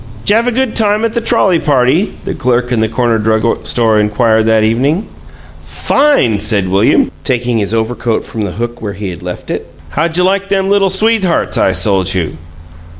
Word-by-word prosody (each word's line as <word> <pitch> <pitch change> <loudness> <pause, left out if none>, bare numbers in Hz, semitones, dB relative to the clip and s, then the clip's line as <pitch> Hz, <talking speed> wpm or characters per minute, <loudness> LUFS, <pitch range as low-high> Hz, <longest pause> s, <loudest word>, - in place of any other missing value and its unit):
"... 110 - -18
'Jav 225 +3 +2
a - - +2
good 255 0 -1
time 215 0 +1
at 225 - -2
the 235 - -1
trolley 195 -6 +2
party?" 145 +8 +1
the 195 - -3
clerk 125 0 -1
in 120 - +1
the 110 - 0
corner 120 -1 0
drug 110 +1 0
store 115 -3 +2
inquired 110 +1 +1
that 110 -1 +3
evening. 135 - 0 0.6
"Fine!" 275 - +1
said 100 -3 +1
William, 100 +4 +2
taking 120 -3 -1
his 100 -1 -2
overcoat 115 0 -2
from 110 - -6
the 100 -4 -3
hook 120 +2 -5
where 105 -2 -4
he 100 0 -5
had 85 - -10
left 90 0 -7
it. - - -5 0.2
"How 160 - 0
j' 170 +2 -1
like 195 +1 0
them 195 0 0
Little 200 -1 +3
Sweethearts 195 -2 +1
I - - +3
sold 95 -2 +1
you?" 80 -5 -2
120 Hz, 195 wpm, -13 LUFS, -, 0.6 s, that